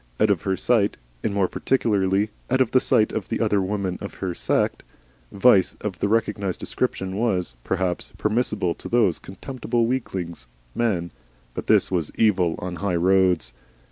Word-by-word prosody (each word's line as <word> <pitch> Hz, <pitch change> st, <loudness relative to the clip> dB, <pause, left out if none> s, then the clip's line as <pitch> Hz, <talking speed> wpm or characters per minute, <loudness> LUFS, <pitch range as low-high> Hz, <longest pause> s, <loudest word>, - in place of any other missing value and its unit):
Out 110 Hz, -, +4 dB
of 95 Hz, -, +1 dB
her 95 Hz, -2 st, -1 dB
sight, 110 Hz, -5 st, +2 dB, 0.3 s
and -, -, 0 dB
more 100 Hz, -2 st, +2 dB
particularly 100 Hz, -5 st, +1 dB, 0.2 s
out 130 Hz, -, +2 dB
of 130 Hz, -4 st, +2 dB
the 130 Hz, -, +5 dB
sight 110 Hz, -3 st, +2 dB
of 110 Hz, -1 st, -3 dB
the 115 Hz, -, -1 dB
other 105 Hz, -3 st, +2 dB
women 95 Hz, -1 st, -2 dB
of 100 Hz, -, -7 dB
her 95 Hz, -2 st, -3 dB
set, -, -, 0 dB, 0.5 s
vice 100 Hz, -2 st, +4 dB
of 95 Hz, -5 st, -5 dB
the -, -, +1 dB
recognised 105 Hz, -3 st, 0 dB
description 95 Hz, 0 st, -2 dB
was, 95 Hz, -, 0 dB
perhaps, 95 Hz, -2 st, -2 dB
permissible 105 Hz, -5 st, 0 dB
to -, -, -9 dB
those 110 Hz, -8 st, +3 dB
contemptible 120 Hz, +4 st, -2 dB
weaklings, 95 Hz, -, -3 dB, 0.3 s
men, 90 Hz, -8 st, 0 dB, 0.4 s
but -, -, -6 dB
this -, -, +4 dB
was 85 Hz, -5 st, -1 dB
Evil 90 Hz, -6 st, +3 dB
on 90 Hz, 0 st, -5 dB
the 85 Hz, -, -7 dB
High 100 Hz, -2 st, 0 dB
Roads. 90 Hz, -7 st, +3 dB
100 Hz, 170 wpm, -24 LUFS, 90-110 Hz, 0.5 s, the